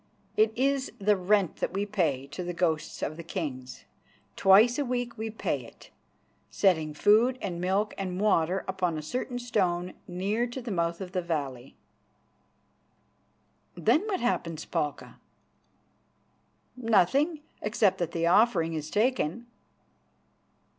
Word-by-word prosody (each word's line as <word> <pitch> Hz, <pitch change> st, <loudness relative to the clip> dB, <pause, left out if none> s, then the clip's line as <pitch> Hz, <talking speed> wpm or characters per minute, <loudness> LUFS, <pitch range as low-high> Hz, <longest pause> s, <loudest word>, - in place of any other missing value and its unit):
It 215 Hz, 0 st, +4 dB
is 275 Hz, +1 st, 0 dB
the 205 Hz, -1 st, +3 dB
rent 195 Hz, 0 st, +1 dB
that -, -, -2 dB
we 200 Hz, +1 st, -1 dB
pay 165 Hz, -10 st, 0 dB
to 180 Hz, -, -5 dB
the 175 Hz, 0 st, -4 dB
ghosts 165 Hz, -3 st, -1 dB
of 155 Hz, -, -3 dB
the 170 Hz, -, -7 dB
kings. 140 Hz, -8 st, -6 dB, 0.5 s
Twice 220 Hz, +7 st, +5 dB
a -, -, +2 dB
week 245 Hz, -2 st, -2 dB
we 220 Hz, -1 st, -4 dB
pay 220 Hz, -, -2 dB
it, -, -, -16 dB, 0.6 s
setting 160 Hz, -6 st, +1 dB
food 225 Hz, +9 st, +4 dB
and 175 Hz, -4 st, -4 dB
milk 195 Hz, +4 st, 0 dB
and 185 Hz, -1 st, -3 dB
water 190 Hz, -3 st, +2 dB
upon 185 Hz, -4 st, -1 dB
a 155 Hz, -, -5 dB
certain 250 Hz, -, -3 dB
stone 185 Hz, -7 st, -1 dB
near 200 Hz, +7 st, -1 dB
to 240 Hz, +2 st, -6 dB
the 240 Hz, -3 st, -6 dB
mouth 170 Hz, -1 st, -1 dB
of 185 Hz, -1 st, -6 dB
the 185 Hz, -1 st, -1 dB
valley." 140 Hz, -7 st, -4 dB, 2.0 s
"Then 315 Hz, -, +3 dB
what 385 Hz, -4 st, -1 dB
happens, 165 Hz, -9 st, -1 dB
Palka?" 150 Hz, -4 st, -4 dB, 1.6 s
"Nothing, 255 Hz, -, +2 dB, 0.2 s
except 210 Hz, -3 st, +2 dB
that 170 Hz, -2 st, -1 dB
the 165 Hz, 0 st, -1 dB
offering 170 Hz, -3 st, +3 dB
is 155 Hz, -1 st, -4 dB
taken." 230 Hz, -1 st, 0 dB
190 Hz, 135 wpm, -28 LUFS, 170-225 Hz, 2.0 s, Twice